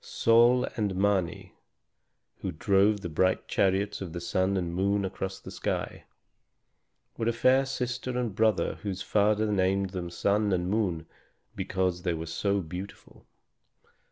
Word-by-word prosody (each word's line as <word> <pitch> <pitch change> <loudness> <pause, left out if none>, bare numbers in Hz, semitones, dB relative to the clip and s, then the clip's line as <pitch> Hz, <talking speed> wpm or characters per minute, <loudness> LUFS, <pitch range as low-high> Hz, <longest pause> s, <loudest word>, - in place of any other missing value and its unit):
Sôl 120 +2 +4
and 105 -5 -1
Mâni, 95 -1 0 0.9
who 95 - -4
drove 100 +4 +2
the 90 - -4
bright 95 +4 +1
chariots 100 +2 +1
of 90 -4 -6
the 85 - -4
sun 95 +3 0
and 85 -2 -2
moon 100 +2 +1
across 95 0 -5
the - - -10
sky, - - -3 1.1
were 115 - -1
a - - +4
fair 130 +3 +3
sister 125 -1 -3
and 120 -4 -1
brother 110 -1 +1
whose 95 -3 -4
father 105 +1 +2
named 95 0 +1
them 90 -2 -4
Sun 100 +4 +1
and 90 0 0
Moon 95 -7 0 0.5
because 90 -2 -1
they 90 -2 -1
were 80 0 -5
so 100 +4 -1
beautiful. 90 +4 -9
95 Hz, 145 wpm, -28 LUFS, 90-105 Hz, 1.1 s, Sôl